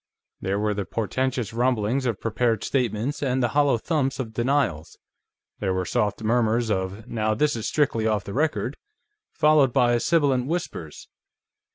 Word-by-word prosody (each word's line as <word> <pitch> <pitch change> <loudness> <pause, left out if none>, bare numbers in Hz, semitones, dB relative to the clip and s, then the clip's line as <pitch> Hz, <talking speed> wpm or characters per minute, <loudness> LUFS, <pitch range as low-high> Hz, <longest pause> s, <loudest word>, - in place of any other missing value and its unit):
There 95 +1 -1
were 105 0 0
the 100 -1 -3
portentous 120 +2 -2
rumblings 125 +1 +1
of 115 -5 -2
prepared 115 0 0
statements, 125 +1 -1
and 130 -2 0
the 120 - +2
hollow 145 -2 +3
thumps 135 0 -1
of 115 -4 -4
denials. 120 - 0 0.6
There 95 -2 -1
were 95 0 -1
soft 105 +5 -1
murmurs 115 0 +1
of, 95 +3 -3
"Now, 110 -2 0
this 145 +4 +1
is 115 - -3
strictly 115 -7 +1
off 105 -3 0
the 100 - -7
record 130 -4 -1 0.3
..." 420 +1 -55
followed 150 -4 +5
by 120 0 +3
sibilant 140 -5 +2
whispers. 150 - -5
120 Hz, 160 wpm, -24 LUFS, 105-135 Hz, 0.6 s, followed